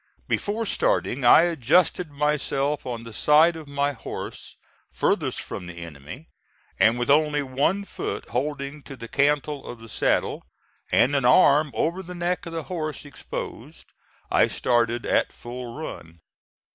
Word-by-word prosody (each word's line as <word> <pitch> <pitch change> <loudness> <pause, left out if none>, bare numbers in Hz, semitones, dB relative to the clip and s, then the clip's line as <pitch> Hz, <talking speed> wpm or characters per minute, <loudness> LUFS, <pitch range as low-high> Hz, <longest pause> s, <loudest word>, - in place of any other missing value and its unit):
Before 220 +3 -1
starting 140 - 0
I 120 +6 +8
adjusted 170 +2 +2
myself 145 -1 -1
on 120 -2 -4
the 115 -1 -10
side 155 +7 +5
of 160 -2 -9
my 140 0 0
horse 115 - -8 0.3
furthest - - 0
from 90 - -6
the 90 - -9
enemy, 85 - -9 0.5
and 115 +2 +5
with 120 +3 +1
only 150 0 +3
one 140 +9 0
foot - - -5
holding 140 +3 -3
to 135 - -10
the 115 - -8
cantle 145 +2 +1
of 120 - -8
the 115 0 -13
saddle, - - 0 0.5
and 140 +4 +4
an 140 - +1
arm 145 +4 +5
over 170 +4 0
the 180 0 -9
neck 175 0 -2
of 165 - -7
the 165 -1 -3
horse 155 -3 -5
exposed, 145 0 -8 0.4
I - - +5
started 120 -1 0
at - - +1
full 120 0 -8
run. 85 - -8
145 Hz, 150 wpm, -25 LUFS, 120-155 Hz, 0.5 s, I